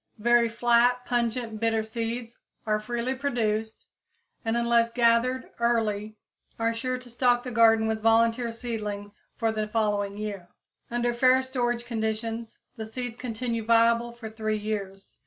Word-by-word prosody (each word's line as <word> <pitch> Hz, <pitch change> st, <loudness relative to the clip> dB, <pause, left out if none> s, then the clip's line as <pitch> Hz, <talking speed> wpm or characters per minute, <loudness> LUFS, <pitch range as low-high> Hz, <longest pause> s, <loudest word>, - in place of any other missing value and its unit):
Very 235 Hz, +1 st, +4 dB
flat, 240 Hz, +2 st, +3 dB
pungent, 235 Hz, -2 st, -1 dB
bitter 225 Hz, -1 st, +1 dB
seeds 230 Hz, +1 st, -5 dB, 0.3 s
are 215 Hz, -1 st, +1 dB
freely 240 Hz, +3 st, -2 dB
produced, 225 Hz, -5 st, -2 dB, 0.6 s
and 225 Hz, +1 st, 0 dB
unless 235 Hz, 0 st, +3 dB
gathered 240 Hz, +2 st, +2 dB
early 220 Hz, -3 st, 0 dB, 0.4 s
are 230 Hz, 0 st, +1 dB
sure 255 Hz, +2 st, -2 dB
to 250 Hz, 0 st, -12 dB
stock 245 Hz, 0 st, +2 dB
the 250 Hz, -, -5 dB
garden 225 Hz, -1 st, +5 dB
with 220 Hz, 0 st, -1 dB
volunteer 230 Hz, +1 st, +3 dB
seedlings 210 Hz, -3 st, -5 dB, 0.2 s
for 225 Hz, -2 st, +1 dB
the 215 Hz, -1 st, -2 dB
following 205 Hz, -2 st, 0 dB
year. 200 Hz, -4 st, -5 dB, 0.4 s
Under 240 Hz, 0 st, 0 dB
fair 255 Hz, +2 st, +4 dB
storage 240 Hz, -2 st, -1 dB
conditions, 225 Hz, 0 st, -3 dB, 0.2 s
the 220 Hz, -, -4 dB
seeds 245 Hz, 0 st, -5 dB
continue 235 Hz, -2 st, -3 dB
viable 230 Hz, +1 st, +3 dB
for 235 Hz, -1 st, -9 dB
three 215 Hz, -1 st, -2 dB
years. 200 Hz, -2 st, -5 dB
230 Hz, 140 wpm, -27 LUFS, 220-240 Hz, 0.6 s, garden